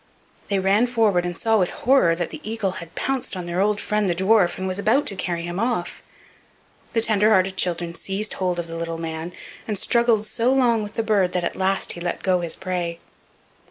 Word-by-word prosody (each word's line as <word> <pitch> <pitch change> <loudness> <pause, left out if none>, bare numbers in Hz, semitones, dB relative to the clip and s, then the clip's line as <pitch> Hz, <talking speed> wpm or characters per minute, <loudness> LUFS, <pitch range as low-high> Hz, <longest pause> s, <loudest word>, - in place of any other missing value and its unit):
They 200 - +1
ran 195 +5 +3
forward, 215 -7 +2
and 175 -1 -5
saw 225 -1 +2
with 180 - +2
horror 250 -10 +3
that 175 0 -3
the 310 - -8
eagle 215 -3 -2
had 165 -1 -12
pounced 265 -7 -2
on 180 - -5
their 175 +2 -1
old 210 +1 +1
friend 210 -2 0
the 175 - +1
dwarf, 190 0 +3
and 190 - -3
was 185 +1 -2
about 235 +8 +2
to 195 - -2
carry 170 -2 -2
him 175 +2 -4
off. 230 -6 -2 0.9
The 225 - +3
tender 215 -1 +4
hearted 190 -2 +3
children 170 -2 -1
seized 200 +4 -3
hold 180 -2 -1
of 175 - -2
the 165 0 -7
little 165 0 -4
man, 165 +1 -5 0.4
and 210 -2 -2
struggled 235 -1 +2
so 230 +3 0
long 245 -4 +3
with 210 0 -7
the 225 - 0
bird 200 -5 +2
that 180 -1 0
at - - -2
last 190 +1 0
he 170 - -6
let 175 0 -3
go 185 -1 +2
his 170 -2 -1
prey. 175 -2 -3
190 Hz, 220 wpm, -23 LUFS, 175-220 Hz, 0.9 s, tender